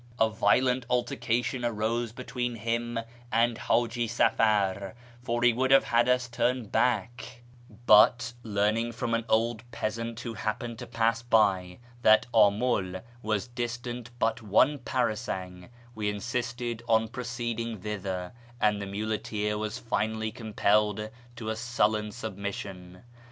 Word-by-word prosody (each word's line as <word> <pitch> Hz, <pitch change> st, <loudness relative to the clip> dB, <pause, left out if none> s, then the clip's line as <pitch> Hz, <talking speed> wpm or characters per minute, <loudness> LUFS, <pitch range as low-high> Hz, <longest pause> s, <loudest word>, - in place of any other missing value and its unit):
A 110 Hz, 0 st, +4 dB
violent 125 Hz, +3 st, +2 dB
altercation 120 Hz, 0 st, 0 dB
arose 115 Hz, 0 st, -1 dB
between 125 Hz, 0 st, -4 dB
him 115 Hz, +1 st, -2 dB, 0.3 s
and 115 Hz, +1 st, +3 dB
Haji 120 Hz, +1 st, 0 dB
Safar, 105 Hz, -3 st, +1 dB, 0.3 s
for 120 Hz, -1 st, -1 dB
he 120 Hz, -1 st, +6 dB
would 130 Hz, +3 st, +1 dB
have 135 Hz, 0 st, +7 dB
had 120 Hz, +1 st, +2 dB
us 125 Hz, 0 st, +2 dB
turn 125 Hz, 0 st, 0 dB
back; 120 Hz, +1 st, -1 dB, 0.4 s
but, 120 Hz, +2 st, +6 dB
learning 110 Hz, +2 st, 0 dB
from 115 Hz, 0 st, -2 dB
an 115 Hz, 0 st, 0 dB
old 115 Hz, 0 st, +2 dB
peasant 115 Hz, 0 st, -3 dB
who 115 Hz, -, -5 dB
happened 110 Hz, +2 st, -4 dB
to -, -, -7 dB
pass 115 Hz, 0 st, +1 dB
by 100 Hz, -6 st, +2 dB, 0.2 s
that 110 Hz, -2 st, +6 dB
Amul 100 Hz, -3 st, +2 dB, 0.2 s
was 110 Hz, +1 st, -1 dB
distant 120 Hz, 0 st, -4 dB
but 115 Hz, 0 st, 0 dB
one 115 Hz, +7 st, +3 dB
parasang, 105 Hz, -7 st, -3 dB, 0.2 s
we 105 Hz, -2 st, -2 dB
insisted 120 Hz, +2 st, -3 dB
on 110 Hz, 0 st, +4 dB
proceeding 115 Hz, -1 st, -4 dB
thither, 95 Hz, -2 st, -4 dB, 0.3 s
and 105 Hz, -2 st, +2 dB
the 100 Hz, -, -4 dB
muleteer 105 Hz, +1 st, -2 dB
was 110 Hz, +1 st, -3 dB
finally 110 Hz, -1 st, -2 dB
compelled 105 Hz, -1 st, +1 dB, 0.2 s
to 115 Hz, -2 st, -5 dB
a 110 Hz, -, -1 dB
sullen 110 Hz, -2 st, 0 dB
submission. 100 Hz, -4 st, -6 dB
115 Hz, 130 wpm, -28 LUFS, 105-120 Hz, 0.4 s, have